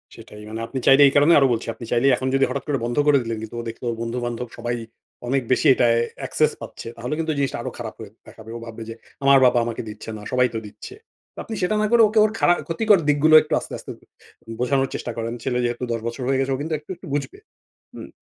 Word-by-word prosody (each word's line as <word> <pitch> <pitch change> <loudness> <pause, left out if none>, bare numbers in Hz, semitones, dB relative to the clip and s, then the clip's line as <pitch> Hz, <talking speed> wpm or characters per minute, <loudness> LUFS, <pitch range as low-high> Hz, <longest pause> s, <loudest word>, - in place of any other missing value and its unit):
সেটাই। 105 - -12
মানে 110 - -6
আপনি 130 - -4
চাইলেই, 140 +1 +7
এই 135 - +1
কারণে 145 +4 +6
আরো 135 - +4
বলছি, 115 - -4
আপনি 115 - -10
চাইলে 120 +3 +2
এখন 130 +1 -4
যদি 135 - +4
হঠাৎ 135 0 -3
করে 145 -2 0
বন্ধ 120 +2 -3
করে 145 -1 +6
দিলেন, 115 -1 -4
কিন্তু 110 +1 -8
ও - - -5
দেখলো 115 +2 -9 0.2
বন্ধু-বান্ধব 120 +1 -3
সবাই 120 0 -2 0.5
অনেক 135 +2 +1
বেশি 130 - +3
এটায় 115 -2 +3 0.3
access - - +2
পাচ্ছে, - - -9
তাহলে 125 +4 -4
কিন্তু 160 -1 -1
এই 145 - -6
জিনিসটা 140 -1 -1
আরো - - -5
খারাপ 115 -2 -6
হয়ে, 105 -2 -9 0.2
দেখাবে। 110 0 -13
ও - - -6
ভাববে 115 0 -8
যে, 115 - -6 0.3
"আমার 140 0 +6
বাবা 125 -1 +4
আমাকে 115 -1 -4
দিচ্ছে 105 +1 -9
না, - - -10
সবাই 125 0 +3
তো 110 - -2
দিচ্ছে।" 105 - -11 0.5
আপনি 225 - -6
সেটা 180 +4 +1
না 215 - +2
করে 235 -1 +6
ওকে 215 +1 +2
ওর 215 - 0
খারা 175 - +5
ক্ষতিকর 205 +3 +3
দিকগুলো 150 +2 +5
একটু 155 - -5
আস্তে, - - -9
আস্তে - - -9 0.7
বোঝানোর 135 +2 +1
চেষ্টা 120 - -4
করেন। 115 0 -3
ছেলে 125 -2 -1
যেহেতু 120 +1 -3
১০ 115 - -2
বছর 115 +2 -5
হয়ে 135 0 +1
গেছে 135 0 0
ও - - -4
কিন্তু 160 +1 -3
একটু, 150 - -30
একটু 175 +1 -13
বুঝবে। 145 - -3 0.6
হুম, - - -9
125 Hz, 240 wpm, -22 LUFS, 115-145 Hz, 0.7 s, চাইলেই